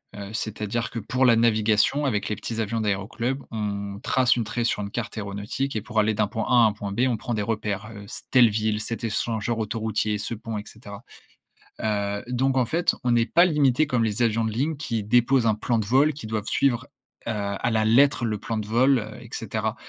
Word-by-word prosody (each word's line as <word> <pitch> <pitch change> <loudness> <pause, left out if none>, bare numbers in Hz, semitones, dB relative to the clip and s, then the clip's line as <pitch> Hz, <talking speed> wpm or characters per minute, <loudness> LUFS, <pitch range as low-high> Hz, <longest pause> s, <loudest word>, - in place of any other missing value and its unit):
heu, 100 0 -7
c'est-à-dire 110 +1 -3
que - - -6
pour 125 +5 -1
la 120 -2 +6
navigation 115 +4 +2
avec 105 -7 -1
les 105 - -1
petits 115 +1 -5
avions 110 +1 -2
d'aéroclubs, 110 +6 -2
on 100 -2 -4
trace 130 -1 +3
une 120 - 0
trait 115 +2 -3
sur 115 -2 0
une 100 - -4
carte 115 0 -4
aéronautique 105 +6 -3
et 110 - -1
pour 110 -1 -1
aller 110 +1 +3
d'un 105 0 +2
point 110 +2 -3
A - - +2
à 120 -2 +7
un 105 - 0
point 100 -1 -6
B, 100 - -1
on 125 - +1
prend 120 - -4
des 105 - -1
repères, 105 -1 -2
heu, 105 - -9
c'est - - -6
telle 125 -3 +6
ville, 110 0 -1
cet 115 +2 -4
échangeur 115 +1 -1
autoroutier, 110 -1 -1
ce 105 - -4
pont, 110 0 -5
et 105 - -5
cetera. 100 -3 -11 0.8
Heu, 100 -1 -1
donc 130 +2 +1
en 130 - +4
fait, 165 +8 +1
on 120 -1 +2
est 115 - +3
pas 175 - +6
limité 150 -3 +3
comme 125 -5 +1
les 110 +1 -2
avions 115 0 +1
de 110 - -1
ligne 145 +7 -1
qui 115 -7 -3
déposent 120 +3 +3
un 110 - +3
plan 115 +2 0
de 110 - -2
vol, 135 +8 +3
qui 145 -1 -9
doivent 110 -1 -3
suivre, 125 -3 +1 0.4
heu, 115 - 0
à 100 +2 -2
la 110 -1 +2
lettre 120 +1 +4
le 110 -2 -1
plan 110 +2 -3
de 105 -1 -4
vol, 130 +4 +4
heu, 105 -1 -8
et - - -11
cetera. - - -3
110 Hz, 230 wpm, -25 LUFS, 105-125 Hz, 0.8 s, à